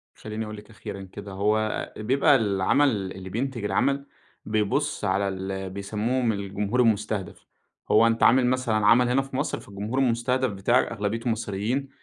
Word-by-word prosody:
خلّيني 110 +1 -5
أقول 105 0 -7
لِك 105 - -13
أخيرًا 105 -2 -8
كده، 100 +1 -9
هو 105 +2 0
بيبقى 135 +6 +3
العمل 100 0 +2
اللي 95 0 -8
بينتج 120 +1 -3
العمل، 140 +6 +1 0.4
بيبُص 105 -1 0
على 100 +1 +1
ال 95 0 -4
بيسمّوهم 110 +5 -1
الجمهور 100 +3 -2
المُستهدَف، 105 -4 -1 0.5
هو 115 +2 +6
أنت 115 0 +1
عامل 125 +1 +6
مثلًا 130 -3 +1
عمل 120 +2 +5
هنا 135 +2 +3
في 135 -1 -9
مصر - - -1
فالجمهور 105 +6 -4
المُستهدَف 125 0 +1
بتاعك 100 +6 +2
أغلبيته 115 +2 -2
مصريين، 115 +5 -2
110 Hz, 150 wpm, -25 LUFS, 100-125 Hz, 0.5 s, هو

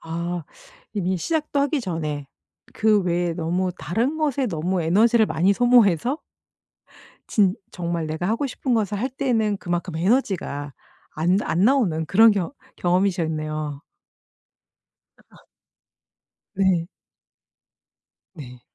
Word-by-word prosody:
아 170 0 -4 0.5
이미 185 -2 0
시작도 300 - -1
하기 285 0 +1
전에 155 - -4 0.5
그 215 -1 +3
외에 175 -1 0
너무 175 +3 -1
다른 240 - -1
것에 280 -4 0
너무 175 0 -1
에너지를 220 +7 +4
많이 180 +3 +2
소모해서 245 - +3 1.1
진 195 -3 +3 0.2
정말 170 -2 -3
내가 160 +4 -3
하고 230 +6 0
싶은 255 -1 -2
것을 210 -2 0
할 255 - 0
때는 230 -6 0
그만큼 175 -1 -3
에너지가 175 - 0 0.4
안 175 +5 +2
안 175 +4 +1
나오는 205 - +2
그런 225 +6 +6
경 200 +2 -1 0.2
경험이셨네요. 155 -5 -1 1.5
아. - - -19 1.1
네. 185 -3 +2 1.5
네. 125 -6 -11
185 Hz, 220 characters per minute, -23 LUFS, 165-225 Hz, 1.5 s, 그런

